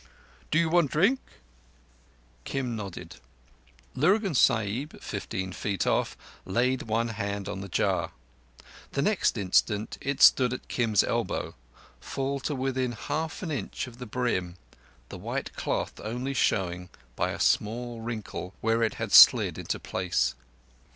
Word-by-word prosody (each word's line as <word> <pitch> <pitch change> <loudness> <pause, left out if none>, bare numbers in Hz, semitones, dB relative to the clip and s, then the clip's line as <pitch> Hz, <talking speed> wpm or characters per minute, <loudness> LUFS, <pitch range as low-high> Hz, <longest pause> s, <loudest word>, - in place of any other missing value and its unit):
"Do 155 - +2
you 170 0 +3
want 165 -3 +3
drink?" 200 - +3 1.2
Kim 125 - -3
nodded. 100 - -7 0.8
Lurgan 190 +7 +2
Sahib, 115 +3 +1
fifteen 95 0 -4
feet 100 0 -2
off, - - 0 0.3
laid 125 +6 +1
one 115 +2 +1
hand 100 -2 -3
on 95 - -4
the 100 - -6
jar. - - 0 0.9
Next 180 - +2
instant, 105 +2 +1
it 140 0 -2
stood 125 -3 +6
at 125 - -7
Kim's 110 -5 +2
elbow, - - -2 0.5
full 135 +1 -3
to 145 +2 -3
within 130 -1 -1
half 150 +9 -4
an 165 - -3
inch 130 -10 -3
of 125 -1 -13
the 125 - -7
brim—the 90 - -5
white - - -4
cloth - - -2
only 125 +5 -3
showing, 90 -7 0 0.3
by - - 0
a - - -5
small 115 +2 0
wrinkle, 110 -5 -6
where 115 +1 +1
it 110 - +1
had - - -4
slid - - +8
into - - -3
place. 90 -9 0
120 Hz, 135 wpm, -28 LUFS, 100-135 Hz, 1.2 s, slid